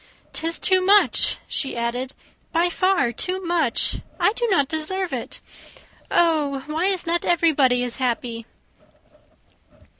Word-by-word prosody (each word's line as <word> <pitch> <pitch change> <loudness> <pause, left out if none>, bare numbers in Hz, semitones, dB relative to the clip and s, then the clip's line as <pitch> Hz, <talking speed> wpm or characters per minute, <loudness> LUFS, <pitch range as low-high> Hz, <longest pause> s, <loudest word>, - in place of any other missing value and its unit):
"'Tis 330 +1 -2
too 375 -1 +3
much!" 405 +2 +4
she 270 -4 -2
added, 245 +2 -3 0.4
"by 340 +2 +2
far 370 -8 +1
too 365 +10 -2
much. 330 -8 +1 0.2
I 415 - +3
do 475 0 -1
not 285 -9 +2
deserve 335 +5 -1
it. - - -5 0.7
Oh, 300 -5 +1
why 315 +4 -2
is 380 -2 +1
not 340 +1 0
everybody 290 -8 +2
as 245 -1 -2
happy?" 235 -2 -3
320 Hz, 125 wpm, -22 LUFS, 260-365 Hz, 0.7 s, much